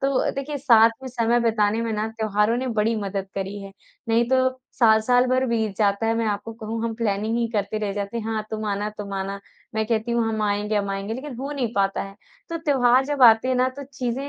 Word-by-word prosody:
तो 275 Hz, -1 st, +1 dB
देखिए 280 Hz, +2 st, -4 dB
साथ 230 Hz, -4 st, +6 dB
में 260 Hz, -, -5 dB
समय 240 Hz, -1 st, +1 dB
बिताने 220 Hz, -1 st, +1 dB
में 230 Hz, -1 st, -2 dB
ना 215 Hz, 0 st, -1 dB
त्योहारों 220 Hz, 0 st, 0 dB
ने 260 Hz, -, -2 dB
बड़ी 225 Hz, +2 st, +2 dB
मदद 195 Hz, -1 st, -3 dB
करी 195 Hz, +1 st, -4 dB
है। 195 Hz, -, -9 dB, 0.4 s
नहीं 230 Hz, +1 st, +3 dB
तो 260 Hz, -, +3 dB, 0.4 s
साल-साल 235 Hz, +2 st, +4 dB
भर 255 Hz, +1 st, +1 dB
बीत 220 Hz, -4 st, -1 dB
जाता 205 Hz, +1 st, +1 dB
है 225 Hz, -, +2 dB
मैं 230 Hz, -1 st, 0 dB
आपको 205 Hz, +2 st, -3 dB
कहूँ 225 Hz, 0 st, -5 dB
हम 230 Hz, -, -2 dB
प्लानिंग 220 Hz, 0 st, -1 dB
ही 235 Hz, -, +1 dB
करते 210 Hz, +1 st, -1 dB
रह 210 Hz, -2 st, -2 dB
जाते 200 Hz, +2 st, -4 dB
हैं। 220 Hz, -, -5 dB
हाँ 220 Hz, -1 st, -2 dB
तुम 220 Hz, 0 st, -4 dB
आना, 205 Hz, +1 st, -2 dB
तुम 200 Hz, -1 st, -6 dB
आना 195 Hz, +1 st, -4 dB, 0.3 s
मैं 220 Hz, 0 st, 0 dB
कहती 225 Hz, +1 st, -1 dB
हूँ 235 Hz, -1 st, +2 dB
हम 220 Hz, -1 st, -2 dB
आएँगे, 210 Hz, +1 st, 0 dB
हम 200 Hz, -1 st, -1 dB
आएँगे 195 Hz, +3 st, -3 dB
लेकिन 265 Hz, +1 st, -7 dB
हो 270 Hz, +3 st, -5 dB
नहीं 250 Hz, -5 st, -2 dB
पाता 195 Hz, -1 st, +1 dB
है। 195 Hz, 0 st, -9 dB, 0.3 s
तो 335 Hz, 0 st, -3 dB
त्योहार 260 Hz, -4 st, +3 dB
जब 285 Hz, -1 st, -1 dB
आते 225 Hz, +1 st, +7 dB
हैं 260 Hz, -, +2 dB
ना 255 Hz, +1 st, +2 dB
तो 280 Hz, -, -6 dB
चीज़ें 260 Hz, +1 st, -3 dB
225 Hz, 235 wpm, -23 LUFS, 210-245 Hz, 0.4 s, आते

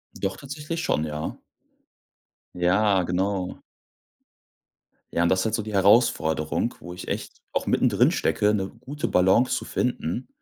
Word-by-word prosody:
Doch, 95 Hz, 0 st, -3 dB
tatsächlich 150 Hz, +4 st, -5 dB
schon, 75 Hz, +1 st, +1 dB
ja. 75 Hz, 0 st, -4 dB, 1.2 s
Ja, 95 Hz, +3 st, +3 dB
genau. 90 Hz, +1 st, -1 dB, 1.5 s
Ja, 85 Hz, -, +1 dB
und 85 Hz, -, +3 dB
das 95 Hz, -, +3 dB
ist -, -, -2 dB
halt 110 Hz, 0 st, +1 dB
so 110 Hz, -, -1 dB
die 105 Hz, 0 st, -7 dB
Herausforderung, 95 Hz, -3 st, +3 dB
wo 90 Hz, -, -9 dB
ich 90 Hz, -, -9 dB
echt -, -, -5 dB
auch -, -, -2 dB
mittendrin -, -, +3 dB
stecke, 105 Hz, 0 st, +1 dB
'ne 95 Hz, -2 st, -1 dB
gute 145 Hz, +3 st, -4 dB
Balance 95 Hz, +7 st, +3 dB
zu -, -, -4 dB
finden 125 Hz, -2 st, -2 dB
95 Hz, 145 wpm, -25 LUFS, 90-115 Hz, 1.5 s, Ja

